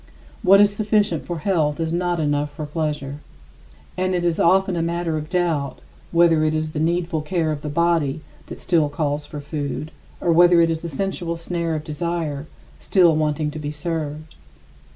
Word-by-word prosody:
What 195 +2 +6
is 205 0 +5
sufficient 205 - +1
for 175 - -3
health 155 -4 0
is 165 0 -1
not 175 0 0
enough 145 -1 0
for 155 - -4
pleasure. 150 -2 -3 0.8
And 185 0 0
it 175 -1 -1
is 170 -2 +1
often 190 +1 +3
a 170 - 0
matter 170 -1 -1
of 155 0 -4
doubt 165 -6 0 0.3
whether 170 -2 +4
it 155 0 +1
is 155 0 -2
the 155 - -3
needful 170 0 0
care 160 0 -1
of 150 -2 -4
the 150 - -4
body 160 -2 +1 0.3
that - - -8
still 160 -5 +2
calls 145 0 -2
for 150 - -7
food 145 +1 -4 0.3
or 175 - +1
whether 175 +1 +6
it 165 0 +4
is 160 -1 -2
the 170 - -5
sensual 170 +1 -3
snare 165 -1 -2
of 155 - -4
desire 155 -2 -3 0.3
still 175 -5 +4
wanting 150 0 0
to 155 - -7
be 145 -1 -4
served. 155 0 -4
160 Hz, 185 wpm, -22 LUFS, 150-175 Hz, 0.8 s, What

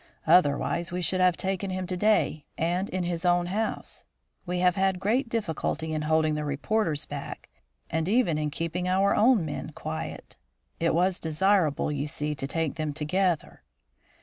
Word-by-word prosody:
"Otherwise, 170 +2 +3
we 180 - -2
should 185 +1 +1
have 180 -2 +4
taken 190 0 -2
him 185 0 -3
to 185 0 -3
day, 205 -6 +2
and 175 +4 0
in 185 -1 -2
his 175 -1 -2
own 175 -1 +3
house. 210 +5 -3 0.4
We 180 0 -1
have 180 0 +4
had 190 -1 +1
great 230 +6 +1
difficulty 160 -7 -2
in 155 - -1
holding 155 0 +2
the 150 0 -2
reporters 150 +2 -1
back - - -7 0.4
and 160 +2 -1
even 205 -9 +2
in 150 -1 -1
keeping 165 +4 -3
our 195 +2 +3
own 225 -5 +4
men 155 0 -5
quiet. 160 +2 -6 0.4
It 165 -1 +2
was 180 +2 +2
desirable, 160 -2 +2
you 145 0 -2
see, 150 +1 -3
to 135 -2 -5
take 165 +1 -2
them 155 -2 -2
together." 165 +3 -1
175 Hz, 170 wpm, -27 LUFS, 155-190 Hz, 0.4 s, have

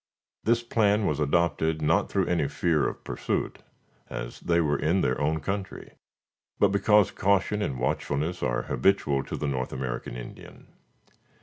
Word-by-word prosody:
This 115 +1 +2
plan 105 -3 +2
was 75 -4 0
adopted, 80 +1 +1
not 75 - +2
through - - +1
any 85 -5 +1
fear 80 -3 +1
of - - -10
pursuit, - - -3 0.5
as 60 -1 -6
they 85 0 +1
were 75 -4 +1
in 85 +5 +2
their - - 0
own 80 +2 +1
country, 95 +5 -5 0.7
but 100 - +4
because 105 +1 +4
caution 100 +2 +1
and 65 -10 -2
watchfulness 75 +6 -1
are 65 +1 0
habitual 70 -3 +1
to - - -5
the - - -3
North 65 -3 -2
American 65 -2 -4
Indian. - - -10
80 Hz, 150 wpm, -27 LUFS, 70-100 Hz, 0.7 s, but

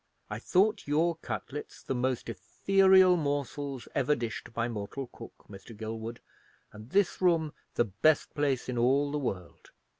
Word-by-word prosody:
I - - -3
thought 205 +1 +2
your 160 +3 +2
cutlets 145 -2 -6
the - - -2
most 130 0 -1
ethereal 190 - +4
morsels 145 -3 -3
ever 145 +2 +2
dished 120 -3 -5
by 115 0 -1
mortal 115 +4 -5
cook, - - -12
Mr. 105 +2 -12
Gilwood, 110 +1 -6 0.5
and 110 +2 -11
this 195 +3 +1
room 165 -4 +2 0.2
the 120 - +3
best 115 +10 +2
place 140 -4 0
in 125 -2 -2
all 140 +4 +3
the 150 - -1
world. 95 -10 -5
135 Hz, 150 wpm, -30 LUFS, 115-155 Hz, 0.5 s, ethereal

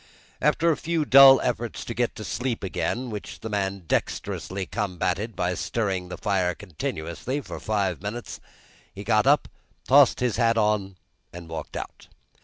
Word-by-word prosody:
After 170 +1 +3
a 155 - 0
few 165 -2 -1
dull 135 -1 +9
efforts 120 -2 -3
to 115 - -4
get 120 0 -1
to 110 - -7
sleep 115 +3 -3
again, 120 +5 -2
which 105 -1 -7
the 110 - -6
man 100 -2 -2
dexterously 95 +4 -2
combated 95 +1 -2
by 90 0 0
stirring 95 -3 -2
the 90 - -6
fire 95 -3 0
continuously 85 - -4
for 140 - -8
five 105 -4 -1
minutes, 110 +4 -6 0.5
he - - -9
got - - +2
up, - - +4 0.4
tossed 140 0 +6
his 125 -3 0
hat 115 -1 +3
on, 105 -3 +1 0.4
and 85 -1 -10
walked 80 -2 -6
out. - - -8
105 Hz, 160 wpm, -25 LUFS, 95-120 Hz, 0.5 s, dull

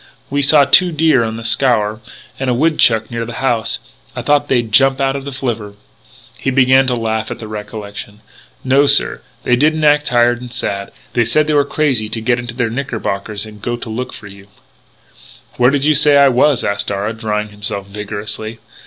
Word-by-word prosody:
"We 145 0 +1
saw 145 0 +5
two 175 +6 +5
deer 155 -5 +2
on 110 0 -3
the 115 - -8
Scaur, 115 -3 +1 0.4
and 135 -1 -1
a 125 - +1
woodchuck 120 -7 +2
near 115 -1 -3
the 120 +1 -7
house; 120 -3 -1 0.4
I - - -5
thought 145 0 +2
they'd 120 -4 0
jump 135 +5 +4
out 135 0 0
of 140 0 -6
the 140 - -5
flivver 115 -6 -4 0.3
" - - -24
He - - 0
began 130 0 +4
to 125 - +1
laugh 110 -1 -2
at - - -5
the 110 - -9
recollection: 105 0 -8 0.4
"No, 135 +2 +3
sir, 140 0 +4 0.2
they 125 - +2
didn't 155 +4 +1
act 150 0 +3
tired 120 -1 +2
and 125 -1 -9
sad; 100 -4 -4 0.2
they 120 - +2
said 150 +7 +2
they 155 - -1
were 145 -1 +4
crazy 135 -8 0
to 115 - -3
get 120 +2 0
into 120 -1 -7
their 120 -3 -1
knickerbockers 110 -5 -4
and 105 -1 -13
go 120 +2 -2
to 120 - -8
look 125 +3 -4
for - - -11
you 100 0 -13 0.6
" - - -24
"Where 125 +1 +4
did 140 0 0
you 155 - +4
say 150 0 +5
I 140 -1 +6
was?" 130 +1 +2
asked 100 0 -2
Darragh, 105 +3 -3
drying 105 -1 -2
himself 105 -1 -4
vigorously. 105 +2 -5
120 Hz, 205 wpm, -16 LUFS, 110-135 Hz, 0.6 s, I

